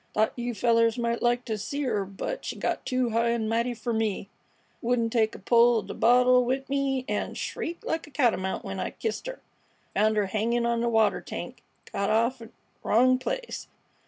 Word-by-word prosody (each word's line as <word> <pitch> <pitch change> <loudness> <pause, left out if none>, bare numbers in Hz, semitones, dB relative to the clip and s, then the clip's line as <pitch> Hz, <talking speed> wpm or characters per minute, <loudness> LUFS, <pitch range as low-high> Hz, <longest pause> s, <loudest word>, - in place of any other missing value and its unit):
"Thought 220 +1 +2
you 240 -1 -3
fellers 230 0 +3
might 235 -1 -1
like 240 +1 +1
t' 220 - -2
see 280 +7 -3
'er, 205 -6 0
but 195 - -5
she - - -4
got - - -2
too 255 -2 0
high 230 +1 +2
an' 230 -2 0
mighty 235 +2 0
fer 235 +1 -3
me, 215 -3 -1 0.5
wouldn't 235 -1 0
take 220 -2 +2
a - - -7
pull 235 -1 +4
at - - -13
th' - - -13
bottle 250 +1 +5
'ith 270 +1 -2
me, 275 -2 0
'n' 210 - -2
shrieked 335 +1 -5
like 325 -1 -2
a - - -13
catamount 235 -9 0
when - - -4
I - - -2
kissed 445 +2 -4
'er. - - -6 0.5
Found 215 +2 +2
'er 205 - +3
hangin' 230 +4 0
on 235 0 +1
th' 235 - +1
water 220 -2 +3
tank. - - -7 0.3
Got 200 - -1
off 235 +4 +2
't 230 - -10
th' - - -30 0.3
wrong 255 +3 +4
place. - - -4
235 Hz, 205 wpm, -27 LUFS, 220-255 Hz, 0.5 s, bottle